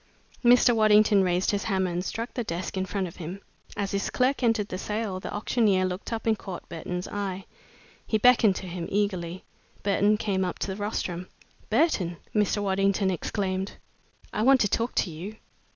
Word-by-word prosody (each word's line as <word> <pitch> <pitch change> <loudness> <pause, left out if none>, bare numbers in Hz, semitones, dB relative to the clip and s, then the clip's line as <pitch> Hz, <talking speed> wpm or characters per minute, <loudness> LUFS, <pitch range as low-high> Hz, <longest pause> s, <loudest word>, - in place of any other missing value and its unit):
Mr. 245 0 +6
Waddington 215 -2 +5
raised 180 0 +1
his 205 -1 -2
hammer 190 -3 0
and 175 +1 -2
struck 230 +5 -4
the 240 - -2
desk 175 -2 -4
in 190 0 -1
front 195 +1 -1
of 165 - -11
him. 175 +3 -6 0.4
As 200 -1 -1
his 200 -1 -1
clerk 260 +2 +1
entered 225 -4 +1
the 185 - -4
sale, 210 -2 -3
the - - -6
auctioneer 205 -3 +2
looked 185 +4 -4
up 225 -1 -3
and 225 -1 +3
caught 190 -4 -8
Burton's 180 +2 -4
eye. 195 -2 -4 0.6
He 220 - +2
beckoned 225 -3 +5
to 190 - -5
him 175 -1 -5
eagerly. 185 -3 -1 0.4
Burton 205 +1 +3
came 200 -3 0
up 180 - -3
to - - -3
the - - -7
rostrum. 185 -4 -3 0.4
"Burton," 180 - +2 0.2
Mr. 210 -1 +1
Waddington 195 0 +2
exclaimed, 190 +2 -2 0.6
"I 210 - -1
want 265 +3 +6
to 205 - +4
talk 230 +4 -1
to 180 - +1
you! 180 +7 -7
200 Hz, 185 wpm, -27 LUFS, 185-215 Hz, 0.6 s, Mr